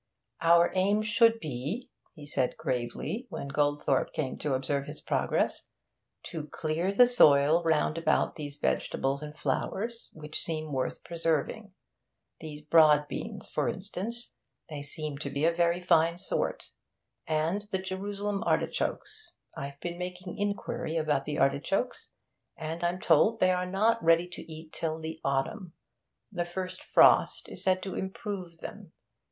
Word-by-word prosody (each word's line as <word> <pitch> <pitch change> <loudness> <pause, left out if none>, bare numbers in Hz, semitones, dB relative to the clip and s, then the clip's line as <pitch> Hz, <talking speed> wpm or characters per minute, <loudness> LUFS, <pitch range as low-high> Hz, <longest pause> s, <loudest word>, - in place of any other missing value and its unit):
'Our 170 +1 +5
aim 200 +3 +2
should 230 +1 +4
be,' 150 - -4 0.2
he 150 -3 -10
said 135 -3 -1
gravely, 130 - -3
when 140 - -5
Goldthorpe 145 -1 +1
came 135 -4 -2
to 145 -3 0
observe 140 +1 -1
his 150 +1 -6
progress, - - 0 0.5
'to 155 -3 -6
clear 160 +5 -1
the 245 +5 +7
soil 155 -9 +5
round 160 0 +2
about 165 - +1
those 145 -2 -6
vegetables 135 -1 0
and 150 0 -8
flowers 225 - -2
which 155 -1 -5
seem 155 -2 -3
worth 130 -1 -2
preserving. 170 +5 -1 0.7
These 150 -1 -8
broad 150 -1 +5
beans, 210 +3 -6
for 145 -5 0
instance 205 - -5 0.4
they 150 -2 -5
seem 145 0 -5
to 145 - -3
be 140 +2 0
a 170 - +4
very 170 +1 +2
fine 170 -1 +3
sort. 190 - -3 0.6
And 160 +5 +1
the 190 - 0
Jerusalem 200 +2 -3
artichokes. 430 -5 -2 0.2
I've 140 0 -6
been 175 0 -4
making 180 0 -5
inquiry 200 -5 -2
about 150 -3 +1
the 150 -1 -3
artichokes, 165 - 0 0.5
and 165 +1 -5
I'm 175 +1 0
told 225 +3 +4
they 185 - +4
are 180 0 0
not 215 +3 +2
ready 165 +1 +4
to 175 - -9
eat 160 0 -10
till 160 -1 -2
the 160 0 -6
autumn. 155 +7 -1 0.6
The 175 -3 -2
first 185 +1 -5
frost - - +5
is - - -8
said 185 -1 +2
to 190 - -4
improve 190 -3 -5
them. - - -9
165 Hz, 145 wpm, -29 LUFS, 150-190 Hz, 0.7 s, the